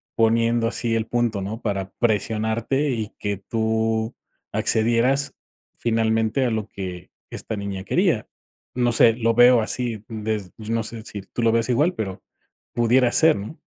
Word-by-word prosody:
poniendo 115 Hz, 0 st, +2 dB
así 115 Hz, 0 st, -1 dB
el 115 Hz, -1 st, 0 dB
punto, 120 Hz, -4 st, 0 dB
¿no?, 105 Hz, +5 st, -5 dB
para 100 Hz, -3 st, -3 dB
presionarte 115 Hz, +5 st, 0 dB
y 110 Hz, -3 st, -3 dB
que 100 Hz, -2 st, -2 dB
tú 110 Hz, +2 st, -1 dB, 0.4 s
accedieras 120 Hz, +5 st, +2 dB, 0.4 s
finalmente 110 Hz, +2 st, +1 dB
a 120 Hz, -, 0 dB
lo 110 Hz, -2 st, -2 dB
que 90 Hz, -2 st, -7 dB, 0.2 s
esta 110 Hz, -, -5 dB
niña 100 Hz, -2 st, -5 dB
quería, 95 Hz, -, +1 dB, 0.5 s
no 120 Hz, -1 st, +2 dB
sé, 115 Hz, 0 st, +6 dB
lo 115 Hz, 0 st, +1 dB
veo 120 Hz, 0 st, +7 dB
así, 115 Hz, 0 st, -2 dB
des 110 Hz, -4 st, -4 dB
no 115 Hz, +1 st, -2 dB
sé 110 Hz, 0 st, -5 dB
si 100 Hz, -, -6 dB
tú 100 Hz, +5 st, -6 dB
lo 115 Hz, -, +4 dB
veas 115 Hz, 0 st, +1 dB
igual, 150 Hz, +9 st, +2 dB
pero 95 Hz, -4 st, -5 dB, 0.5 s
pudiera 120 Hz, +1 st, +3 dB
ser, 160 Hz, 0 st, +5 dB
¿no? 110 Hz, +11 st, -8 dB
115 Hz, 155 wpm, -23 LUFS, 110-120 Hz, 0.5 s, veo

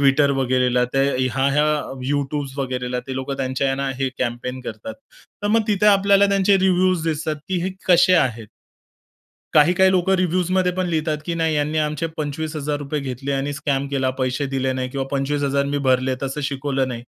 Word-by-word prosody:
Twitter 140 Hz, +1 st, +4 dB
वगैरेला, 125 Hz, -1 st, +2 dB
ते 130 Hz, +2 st, -1 dB, 0.3 s
ह्या-ह्या 135 Hz, +3 st, +1 dB, 0.5 s
YouTube 145 Hz, -1 st, -2 dB
वगैरेला 125 Hz, -2 st, -2 dB
ते 130 Hz, -, -5 dB
लोकं 130 Hz, +1 st, -4 dB
त्यांच्या 130 Hz, 0 st, -1 dB
ह्यांना 135 Hz, +1 st, -1 dB
हे 135 Hz, -, 0 dB
कॅम्पेन 125 Hz, +1 st, -3 dB
करतात. 110 Hz, -1 st, -7 dB, 0.5 s
तर -, -, 0 dB
मग 225 Hz, +1 st, +3 dB
तिथे 210 Hz, 0 st, +2 dB
आपल्याला 200 Hz, 0 st, +5 dB
त्यांचे 195 Hz, 0 st, +3 dB
रिव्ह्यूज 185 Hz, -2 st, +2 dB
दिसतात 155 Hz, -1 st, -1 dB
की 185 Hz, -, 0 dB
हे 185 Hz, -, -1 dB, 0.2 s
कसे 180 Hz, +1 st, +6 dB
आहेत? 115 Hz, -9 st, +1 dB, 1.1 s
काही 150 Hz, +3 st, +6 dB
काही 190 Hz, 0 st, +5 dB
लोकं 190 Hz, +1 st, +2 dB
रिव्ह्जमध्ये 180 Hz, +1 st, +1 dB
पण 185 Hz, 0 st, -1 dB
लिहितात 155 Hz, -2 st, -1 dB
की 170 Hz, -, -1 dB
नाही 160 Hz, -2 st, 0 dB
ह्यांनी 150 Hz, +1 st, 0 dB
आमचे 150 Hz, +1 st, -1 dB
25000 150 Hz, -1 st, -3 dB
घेतले 135 Hz, +1 st, -4 dB
आणि 135 Hz, +1 st, -1 dB
स्कॅम 140 Hz, -1 st, -1 dB
केला. 135 Hz, -2 st, 0 dB
पैसे 130 Hz, +1 st, -2 dB
दिले 135 Hz, -1 st, -1 dB
नाही 130 Hz, 0 st, -3 dB
किंवा 135 Hz, 0 st, -3 dB
25000 140 Hz, 0 st, 0 dB
मी 145 Hz, 0 st, -1 dB
भरले 130 Hz, 0 st, +2 dB
तसं 135 Hz, +2 st, -3 dB
शिकवलं 135 Hz, -1 st, -1 dB
नाही. 120 Hz, -2 st, -6 dB
140 Hz, 170 wpm, -21 LUFS, 130-165 Hz, 1.1 s, कसे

